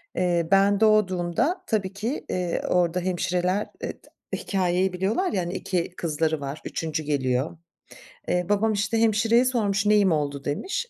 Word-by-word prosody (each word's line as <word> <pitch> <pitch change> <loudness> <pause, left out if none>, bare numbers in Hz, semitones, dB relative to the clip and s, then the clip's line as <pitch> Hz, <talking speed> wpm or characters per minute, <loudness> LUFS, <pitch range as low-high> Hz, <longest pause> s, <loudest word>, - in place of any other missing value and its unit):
Eee, 175 -2 +1
ben 195 +1 +4
doğduğumda 215 - +2
tabii 200 -4 -1
ki, 225 +8 -4
eee, 180 -2 -1
orada 180 0 +2
hemşireler 180 +2 0
e - - -3
t - - -22 0.3
hikâyeyi 185 -1 0
biliyorlar 205 - 0
ya, 190 - 0
hani, 175 +1 -4
2 180 -1 -2
kızları 160 -1 -1
var, 140 +2 -5
3'üncü 155 -1 -3
geliyor. 135 +1 -1 0.7
Eee, 180 0 +1
babam, 215 +1 +2
işte, 215 +3 0
hemşireye 225 +3 +3
sormuş, 210 -5 +1
“Neyim 205 -3 +4
oldu?“ 145 -3 -1
demiş. 390 - -2
185 Hz, 150 wpm, -25 LUFS, 170-210 Hz, 0.7 s, ben